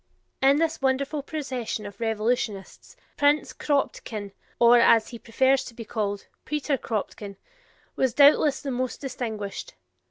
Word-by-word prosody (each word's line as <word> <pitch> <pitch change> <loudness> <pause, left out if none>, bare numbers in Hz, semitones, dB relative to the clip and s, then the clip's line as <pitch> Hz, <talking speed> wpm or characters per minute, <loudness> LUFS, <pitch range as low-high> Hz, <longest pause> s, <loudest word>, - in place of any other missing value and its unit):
In 275 +1 +5
this 320 -1 0
wonderful 275 +2 0
procession 260 -7 -4
of 205 -1 -10
revolutionists, 225 - -2 0.2
Prince 290 +1 +2
Kropotkin, 225 -8 -2 0.3
or, 240 0 +6
as 230 -1 +5
he 235 - -9
prefers 260 +4 +2
to 235 - -10
be 230 - -8
called, 205 -3 -3 0.2
Peter 300 -1 -1
Kropotkin, 210 -4 -5 0.6
was 260 -3 0
doubtless 285 0 +5
the 275 - -3
most 255 0 -3
distinguished. 220 -7 -5
245 Hz, 130 wpm, -25 LUFS, 220-280 Hz, 0.6 s, or